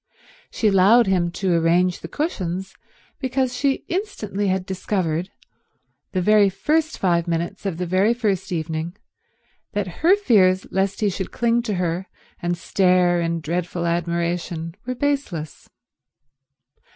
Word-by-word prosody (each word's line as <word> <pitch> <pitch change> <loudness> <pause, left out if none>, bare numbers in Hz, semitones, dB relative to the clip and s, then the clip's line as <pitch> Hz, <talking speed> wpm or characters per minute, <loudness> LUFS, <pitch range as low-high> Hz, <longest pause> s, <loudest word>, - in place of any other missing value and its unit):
She 220 - 0
allowed 205 +5 +6
him 180 -3 +1
to 185 -1 0
arrange 170 +2 +2
the - - -7
cushions 190 - -3 0.5
because 260 -1 -1
she 275 +1 0
instantly 220 - -2
had 190 -1 0
discovered, 185 -2 -2 0.8
the 185 -2 -1
very 210 0 +5
first 315 +11 0
five 175 -2 +1
minutes 170 +4 -2
of 175 -4 -3
the 180 - -2
very 190 +6 +2
first 205 -7 -1
evening, 160 +2 -3 0.8
that 190 -4 -3
her 350 +5 +6
fears 195 - +3
lest 195 +2 0
he 210 - +3
should 190 0 -5
cling 235 0 +1
to 220 -4 -2
her 180 +1 -2 0.3
and 175 0 -1
stare 180 -1 +2
in 165 0 -1
dreadful 170 +2 -2
admiration 170 -1 -2
were 255 - -2
baseless. 245 - -3
185 Hz, 135 wpm, -22 LUFS, 170-215 Hz, 0.8 s, allowed